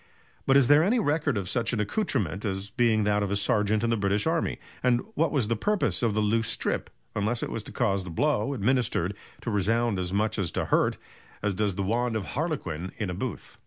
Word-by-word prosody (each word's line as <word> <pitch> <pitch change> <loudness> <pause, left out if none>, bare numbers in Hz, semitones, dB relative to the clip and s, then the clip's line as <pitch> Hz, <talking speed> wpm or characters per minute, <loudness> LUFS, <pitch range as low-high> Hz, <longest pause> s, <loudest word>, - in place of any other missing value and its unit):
But 135 - +6
is 135 -3 +5
there 145 +1 +7
any 205 +9 +3
record 150 - +1
of 95 -2 -3
such 115 +4 0
an 115 - 0
accoutrement 105 - -1
as 100 -1 -3
being 110 -2 +2
that 105 0 +2
of 100 - -1
a 100 - 0
sergeant 105 +1 +2
in 115 - +1
the - - +3
British 100 +1 +1
army? 165 +1 0 0.2
and 125 -1 +2
what 165 -5 +1
was 135 -8 +1
the 115 - +1
purpose 205 - 0
of 115 -4 +1
the 110 - +2
loose 115 +2 +1
strip, - - -1 0.3
unless 110 +3 0
it - - -3
was 115 - -3
to - - -11
cause 100 -6 0
the 90 - -7
blow 140 - 0
administered 115 -5 +1 0.3
to 115 - -3
resound 110 +1 +1
as 90 -1 -2
much 105 +2 +1
as 90 -4 0
to - - -1
hurt, - - +2 0.5
as 105 -1 +1
does 100 -1 0
the 100 - -1
wand 115 +4 0
of 105 -4 -3
Harlequin 95 - -3
in 100 -5 -2
a - - -3
booth." 120 +7 -6
110 Hz, 230 wpm, -27 LUFS, 100-125 Hz, 0.5 s, there